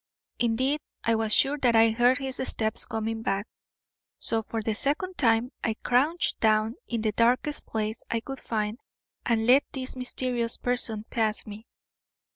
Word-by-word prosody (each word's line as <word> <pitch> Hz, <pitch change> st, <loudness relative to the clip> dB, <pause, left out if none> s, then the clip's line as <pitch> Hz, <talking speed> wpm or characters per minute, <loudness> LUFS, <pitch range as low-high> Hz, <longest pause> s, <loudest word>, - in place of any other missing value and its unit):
Indeed, 255 Hz, +5 st, +1 dB, 0.2 s
I 230 Hz, -, +2 dB
was 220 Hz, -1 st, 0 dB
sure 285 Hz, +6 st, +4 dB
that 245 Hz, -4 st, +2 dB
I 225 Hz, 0 st, +6 dB
heard 245 Hz, +3 st, +3 dB
his 265 Hz, -2 st, -4 dB
steps 220 Hz, -3 st, 0 dB
coming 225 Hz, -1 st, -3 dB
back. 195 Hz, -1 st, -1 dB, 0.7 s
So, 225 Hz, -1 st, -1 dB
for 225 Hz, 0 st, -5 dB
the 220 Hz, -, -1 dB
second 300 Hz, -, -1 dB
time, 230 Hz, 0 st, +2 dB
I 225 Hz, -2 st, 0 dB
crouched 285 Hz, +10 st, +1 dB
down 215 Hz, 0 st, +2 dB
in 235 Hz, -2 st, -2 dB
the 215 Hz, -1 st, 0 dB
darkest 245 Hz, +7 st, +1 dB
place 220 Hz, 0 st, -3 dB
I 230 Hz, -, 0 dB
could 270 Hz, +3 st, -7 dB
find 215 Hz, +1 st, -3 dB, 0.5 s
and 225 Hz, -1 st, +1 dB
let 260 Hz, +4 st, +6 dB
this 260 Hz, -1 st, -5 dB
mysterious 250 Hz, -2 st, +1 dB
person 230 Hz, -3 st, 0 dB
pass 220 Hz, -2 st, 0 dB
me. 215 Hz, +2 st, -10 dB
230 Hz, 160 wpm, -26 LUFS, 220-255 Hz, 0.7 s, I